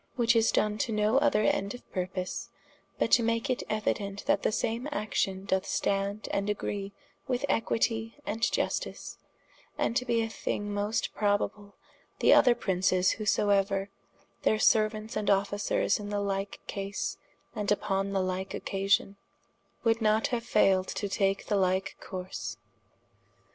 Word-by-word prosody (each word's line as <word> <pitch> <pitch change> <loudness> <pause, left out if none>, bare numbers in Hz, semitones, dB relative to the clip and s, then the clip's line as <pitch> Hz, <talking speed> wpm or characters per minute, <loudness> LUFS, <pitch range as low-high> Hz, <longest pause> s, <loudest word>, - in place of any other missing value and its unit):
Which 235 -1 +3
is 225 0 +4
done 210 0 +1
to 230 - 0
no 215 +4 +3
other 280 -7 +3
end 200 +2 +1
or - - -9
purpose, 185 0 -3 0.5
but - - 0
to - - +6
make 230 +3 0
it 250 - -1
euident 205 -2 -2
that - - +2
the - - +1
same 230 +5 -1
action 195 -5 -1
doth 190 -1 0
stand 200 +1 -1
& - - -8 0.2
agree 200 -1 -3 0.4
with 255 +1 0
equitie 225 0 0
and 225 - -3
iustice, 240 - -1 0.6
and 230 - 0
to 250 - +2
be 235 -2 +1
a - - -1
thing 205 -2 -3
most 205 +2 -1
probable, 205 0 -1 0.4
that - - +5
other 245 -3 +6
Princes 185 -3 +2
whosoeuer, 200 -2 +1 0.5
their 215 - +3
seruants 215 0 +2
and 210 -1 -1
Officers 200 +2 +1
in 205 -1 -6
the 205 0 -1
like 195 0 -2
case, 200 +1 -4 0.4
and 210 -1 -2
vpon 200 -1 0
the 195 -1 +1
like 185 +1 -3
occasion, 195 0 0 0.7
woulde 225 0 +3
not 220 +5 +2
haue 245 -3 0
failed 195 -5 +3
to 205 - -3
take 195 0 0
the 205 - +1
like 190 0 +1
course. 185 0 -6
205 Hz, 150 wpm, -29 LUFS, 195-225 Hz, 0.7 s, to